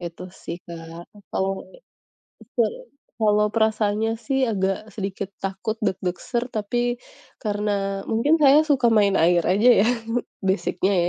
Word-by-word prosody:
Itu 170 0 -7
sih 170 - -7
Kak, 165 0 -9
atau 195 -1 -3 0.8
betul, - - -1 0.5
kalau 210 -1 +3
perasaannya 220 0 +1
sih, 265 +3 0
agak 195 0 -1
sedikit 195 -1 -4
takut 195 +3 -3
deg-deg 185 -3 -1
ser. 240 0 -2
Tapi, 240 +3 -1 0.4
karena 205 -2 -2
mungkin 285 +9 +3
saya 290 +2 +7
suka 275 -5 +3
main 205 -3 +4
air 170 +1 +4
aja 205 +9 +4
ya - - +3 0.6
basic-nya 190 0 +1
205 Hz, 125 wpm, -23 LUFS, 190-225 Hz, 0.8 s, saya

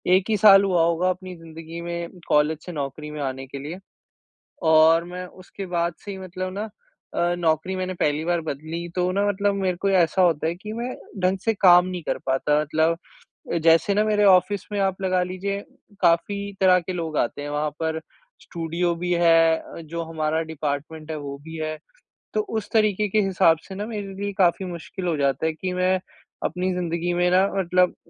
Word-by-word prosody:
1 185 - +2
ही 215 - +2
साल 200 -1 +8
हुआ 180 -4 +3
होगा 170 +2 +2
अपनी 185 0 -4
ज़िन्दगी 165 0 -9
में 170 +1 -5
कॉलेज 150 +1 +2
से 180 - -6
नौकरी 150 0 -5
में 150 - -6
आने 135 -1 -3
के 140 - -7
लिए। 155 +7 -7 0.9
और 160 +1 +6
मैं 180 +1 -6
उसके 185 +2 -10
बाद 170 -1 -1
से 205 - -6
ही 195 - -6
मतलब 185 0 -5
ना 210 - -2 0.5
अ, 175 0 +1
नौकरी 165 +3 0
मैंने 185 0 -3
पहली 150 -2 0
बार 175 0 +1
बदली 160 +4 -5
तो 180 0 +1
ना 200 +2 +1
मतलब 200 0 +1
मेरे 190 -2 -1
को 200 - +2
ऐसा 185 -1 +3
होता 165 -3 +2
है 165 - 0
कि 210 +4 -8
मैं 240 +3 -4 0.3
ढंग 185 +1 +2
से 225 - +2
काम 180 -3 +6
नहीं 180 -2 -5
कर - - -2
पाता 150 +3 +2
मतलब 160 +2 +1 0.7
जैसे 165 +4 +5
ना 210 - +3
मेरे 210 -1 +2
ऑफ़िस 190 +1 +4
में 205 - -1
आप 195 -1 0
लगा 185 -1 +1
लीजिए 190 +2 -3 0.4
काफ़ी 200 +4 +1
तरह 185 -1 +6
के 180 +1 -5
लोग 165 -3 -3
आते 120 - -1
हैं। 145 - -5
वहाँ 150 +1 -1
पर 160 -1 -1 0.4
स्टूडियो 170 +1 -2
भी 175 +1 -3
है 165 -1 +5
अ, 165 - -10
जो 165 +1 -5
हमारा 155 0 0
डिपार्टमेंट 155 +1 -4
है 155 - -3
वो 140 -1 -6
भी 160 +1 -8
है 155 0 -3 0.6
तो - - +2 0.2
उस 215 - -4
तरीक़े 210 -2 +2
के 215 - +2
हिसाब 185 -4 +3
से, 190 - -9
न 205 +2 -4
मेरे 205 -3 -5
लिए 200 0 -2
काफ़ी 185 0 +3
मुश्किल 180 +1 -6
हो 170 - +1
जाता 140 +1 0
है 160 - -1
कि 180 +4 -4
मैं 185 +1 +2 0.5
अपनी 180 +2 -1
ज़िन्दगी 175 -1 -2
में 175 0 +2
न 185 - +6 0.2
मतलब 180 0 +2
175 Hz, 200 wpm, -24 LUFS, 160-190 Hz, 0.9 s, साल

